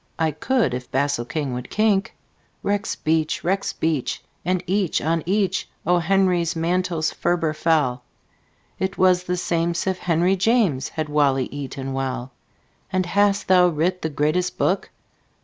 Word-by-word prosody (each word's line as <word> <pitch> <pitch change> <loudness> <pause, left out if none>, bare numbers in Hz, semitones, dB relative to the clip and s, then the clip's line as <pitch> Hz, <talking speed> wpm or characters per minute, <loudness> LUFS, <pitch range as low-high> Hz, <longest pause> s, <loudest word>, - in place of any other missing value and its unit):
I 160 -1 +1
could 215 - 0
If 125 0 -5
basilking 140 0 -1
would 125 0 -5
kink." 215 0 +1 0.5
Rexbeach! 160 -6 0
rexbeach! 165 -6 -1 0.2
and 180 +1 0
each 190 -1 +1
on 165 +1 0
each 195 -1 0 0.2
O. 175 +2 +3
Henry's 180 -1 +2
mantles 170 -1 0
ferber 170 -3 0
fell. 150 -6 +1 0.8
It 190 +1 -2
was 180 -1 +3
the 180 0 -1
same'sif 170 +2 -1
henryjames 180 - +2
Had 155 -1 -3
wally 140 -3 +2
eaton 135 -1 -5
well. 130 -1 -3 0.6
"And 185 -1 +1
hast 200 +2 +2
thou 180 -1 +6
writ 175 +3 0
the 160 - -1
greatest 155 +5 0
book? 190 - 0
170 Hz, 130 wpm, -22 LUFS, 150-185 Hz, 0.8 s, thou